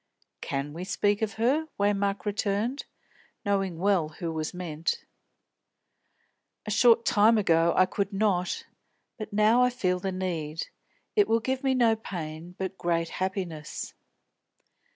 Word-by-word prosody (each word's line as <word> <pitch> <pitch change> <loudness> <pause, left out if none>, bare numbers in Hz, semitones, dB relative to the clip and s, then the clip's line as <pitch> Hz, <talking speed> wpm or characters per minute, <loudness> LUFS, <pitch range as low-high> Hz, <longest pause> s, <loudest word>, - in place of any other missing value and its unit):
"Can 140 +1 -3
we 170 +3 -5
speak 205 +2 +1
of 220 0 -1
her?" 270 +8 +1
Waymark 200 0 +1
returned, 210 +5 -1 0.6
knowing 195 -4 0
well 185 -3 +2
who 165 +1 -5
was 155 -1 -3
meant. 165 -3 -3 1.6
"A 215 - -3
short 230 +1 +5
time 220 +2 +5
ago 170 -4 +3
I 185 - +6
could 200 +2 -2
not; 195 -3 0 0.7
now 215 +4 +4
I 250 - +5
feel 185 -7 0
the 190 +1 -2
need. 165 -4 -3 0.5
It 415 -2 +5
will 230 - +3
give 260 +3 -2
me 265 -1 +2
no 235 -3 +4
pain, 170 -4 -7
but 190 0 -4
great 165 -1 0
happiness." 185 -5 -4
195 Hz, 130 wpm, -27 LUFS, 170-220 Hz, 1.6 s, I